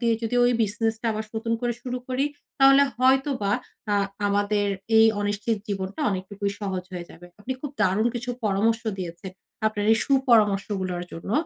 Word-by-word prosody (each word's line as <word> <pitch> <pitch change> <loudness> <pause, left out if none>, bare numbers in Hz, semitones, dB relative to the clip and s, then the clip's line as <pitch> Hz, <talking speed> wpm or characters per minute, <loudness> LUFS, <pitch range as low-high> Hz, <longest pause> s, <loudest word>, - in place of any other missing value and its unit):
দিয়ে 235 -1 +2
যদি 225 +1 -2
ওই 245 - +4
বিজনেসটা 225 +2 -1
আবার 215 0 -3
নতুন 230 +1 -2
করে 240 -1 0
শুরু 250 0 -3
করি, 255 +2 0 0.3
তাহলে 275 +1 +7 0.2
হয়তোবা 260 -5 +2 0.4
আ - - +3 0.3
আমাদের 205 0 +1 0.3
এই 225 - +8
অনিশ্চিত 205 +2 -1
জীবনটা 195 -1 -4
অনেকটুকুই 200 +1 -3
সহজ 190 -3 -3
হয়ে 175 -1 -5
যাবে। 175 - -13
আপনি 245 +5 -3
খুব 290 - -5
দারুণ 205 +2 +3
কিছু 245 +1 -3
পরামর্শ 215 +3 +1 0.2
দিয়েছেন! 175 +1 -6 0.3
আপনার 210 -1 -1
এই - - +4
সুপরামর্শগুলোর 205 -8 +2
জন্য 165 +4 -7
215 Hz, 155 wpm, -25 LUFS, 195-240 Hz, 0.4 s, এই